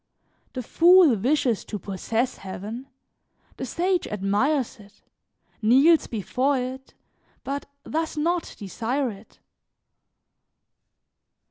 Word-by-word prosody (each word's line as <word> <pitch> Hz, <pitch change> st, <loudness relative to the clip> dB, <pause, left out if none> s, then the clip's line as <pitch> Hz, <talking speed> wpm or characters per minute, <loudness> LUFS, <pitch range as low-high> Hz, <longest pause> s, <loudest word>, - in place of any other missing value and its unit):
The 255 Hz, -, -4 dB
fool 345 Hz, 0 st, +6 dB
wishes 245 Hz, +1 st, +1 dB
to 210 Hz, -, -5 dB
possess 220 Hz, +6 st, -2 dB
heaven; 210 Hz, +7 st, -7 dB, 0.7 s
the 260 Hz, -, -4 dB
sage 355 Hz, +6 st, 0 dB
admires 210 Hz, +7 st, 0 dB
it, 200 Hz, 0 st, -18 dB, 0.6 s
kneels 275 Hz, +9 st, +5 dB
before 255 Hz, +6 st, 0 dB
it, 260 Hz, +1 st, -6 dB, 0.5 s
but 280 Hz, +1 st, -4 dB, 0.2 s
does 320 Hz, 0 st, -2 dB
not 335 Hz, +3 st, -1 dB
desire 235 Hz, +6 st, -2 dB
it. 200 Hz, +2 st, -15 dB
255 Hz, 95 wpm, -25 LUFS, 215-300 Hz, 0.7 s, fool